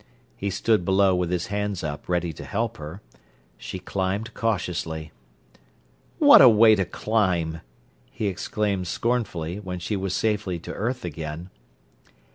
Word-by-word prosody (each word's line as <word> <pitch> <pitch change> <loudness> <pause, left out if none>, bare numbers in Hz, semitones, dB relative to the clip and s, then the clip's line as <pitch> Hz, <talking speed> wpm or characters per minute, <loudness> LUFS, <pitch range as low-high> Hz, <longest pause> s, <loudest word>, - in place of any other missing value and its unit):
He 100 - -3
stood 105 +1 +1
below 95 +1 +3
with 90 -1 0
his 90 -1 -1
hands 105 -3 -2
up 75 +1 -5
ready 85 -2 0
to - - -9
help 115 +2 -2
her. 80 +7 -9 0.5
She - - -7
climbed 95 +4 -3
cautiously. 85 -7 -2 1.1
"What - - +8
a 130 - +10
way 110 0 +7
to 95 -3 +2
climb!" 90 -6 0 0.5
he 110 - -4
exclaimed 100 0 -1
scornfully, 95 -6 -2
when 95 -3 -5
she 90 +4 -3
was 95 -1 -2
safely 105 -4 0
to 85 - -8
earth 120 +1 -3
again. 80 +2 -6
95 Hz, 140 wpm, -25 LUFS, 85-105 Hz, 1.1 s, a